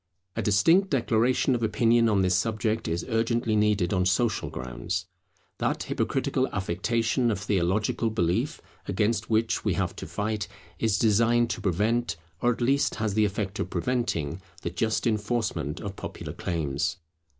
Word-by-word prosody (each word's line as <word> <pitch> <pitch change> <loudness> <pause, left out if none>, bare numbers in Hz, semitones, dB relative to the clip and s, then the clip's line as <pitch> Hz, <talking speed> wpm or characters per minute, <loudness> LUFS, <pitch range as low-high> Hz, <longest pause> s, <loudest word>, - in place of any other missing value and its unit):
A - - -1
distinct 165 - +4
declaration 125 0 +2
of 120 - -1
opinion 115 +1 +3
on 100 -3 +3
this 90 0 +2
subject 110 +3 0
is 85 +1 -2
urgently 115 -1 +1
needed 105 -4 +2
on 90 -1 +2
social 110 +5 +1
grounds. 60 +3 -4 0.5
That - - 0
hypocritical - - 0
affectation 115 +6 0
of 105 - -1
theological 105 +3 0
belief 90 -5 0 0.3
against 105 +4 0
which 115 +1 +1
we - - +1
have - - -1
to - - -6
fight, 105 -1 -2 0.3
is 110 -3 +2
designed 115 +2 +3
to 110 - -4
prevent, 105 +2 +1 0.3
or 120 - +4
at 120 - -4
least 135 +4 +2
has 110 -2 -1
the 110 +1 +3
effect 100 +1 -3
of - - -2
preventing, 95 - -1 0.2
the 85 - -2
just 110 +5 0
enforcement 105 - -1
of 100 -1 -6
popular - - -7
claims. 80 +1 -2
110 Hz, 150 wpm, -27 LUFS, 95-115 Hz, 0.5 s, distinct